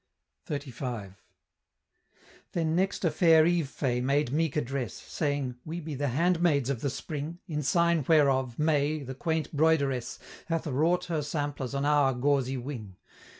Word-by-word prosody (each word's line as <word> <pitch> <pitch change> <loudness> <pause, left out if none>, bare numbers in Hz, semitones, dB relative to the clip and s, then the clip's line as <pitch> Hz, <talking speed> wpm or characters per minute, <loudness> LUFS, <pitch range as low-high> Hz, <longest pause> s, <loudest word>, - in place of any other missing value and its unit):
XXXV. 125 -8 -5 1.4
Then 160 -2 0
next 190 +1 0
a 165 - +3
fair 160 0 +5
Eve 170 -4 +1
Fay 125 -3 -1
made 140 0 +1
meek 160 0 0
address, 135 -6 -2
Saying, 145 -5 -3
"We 165 +2 -5
be 155 -2 -6
the 145 +1 -1
handmaids 160 -1 +2
of 125 -4 -3
the 140 - 0
Spring; 150 +4 -5
In 150 -4 -2
sign 170 +1 +2
whereof, 135 -6 +3
May, 150 -1 +1
the 130 0 -6
quaint 160 +2 -2
broideress, 140 -5 +1 0.3
Hath 165 -1 -1
wrought 165 +6 +1
her 165 -3 -1
samplers 145 -3 -3
on 140 +1 0
our 145 -3 +3
gauzy 135 0 +1
wing. 120 -7 -7
145 Hz, 150 wpm, -28 LUFS, 135-160 Hz, 1.4 s, fair